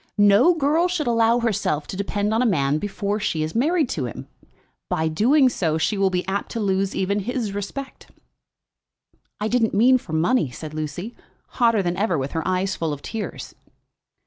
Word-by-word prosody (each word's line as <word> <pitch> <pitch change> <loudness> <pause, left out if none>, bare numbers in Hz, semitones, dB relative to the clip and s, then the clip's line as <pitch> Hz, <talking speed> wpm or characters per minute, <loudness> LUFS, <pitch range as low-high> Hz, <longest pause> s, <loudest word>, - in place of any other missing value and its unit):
No 205 - +5
girl 320 +3 +2
should 355 -4 -2
allow 230 0 +3
herself 200 -10 -1
to - - -7
depend 205 +2 -1
on 225 - +2
a - - +3
man 145 -6 +1
before 205 +1 -2
she 165 -7 -1
is 155 - -4
married 305 +5 +2
to 140 - -2
him. 120 - -7 0.6
By 160 0 0
doing 255 - +4
so 165 -10 0
she 160 +6 0
will 195 -1 +2
be 180 0 -2
apt 195 +1 -2
to 230 - -3
lose 195 -2 0
even 200 +2 0
his 225 0 -3
respect." 235 +7 -6 1.3
"I 210 - -1
didn't 225 -2 +1
mean 255 +5 +5
for 165 - -10
money," 165 - +2
said 150 +5 -8
Lucy, 155 +8 -5 0.3
hotter 230 -5 +2
than 175 0 -2
ever, 195 -4 +1
with 135 0 -3
her 160 - -2
eyes 185 +1 0
full 160 -2 -2
of 145 - -9
tears. 225 -2 -6
200 Hz, 185 wpm, -23 LUFS, 170-235 Hz, 1.3 s, No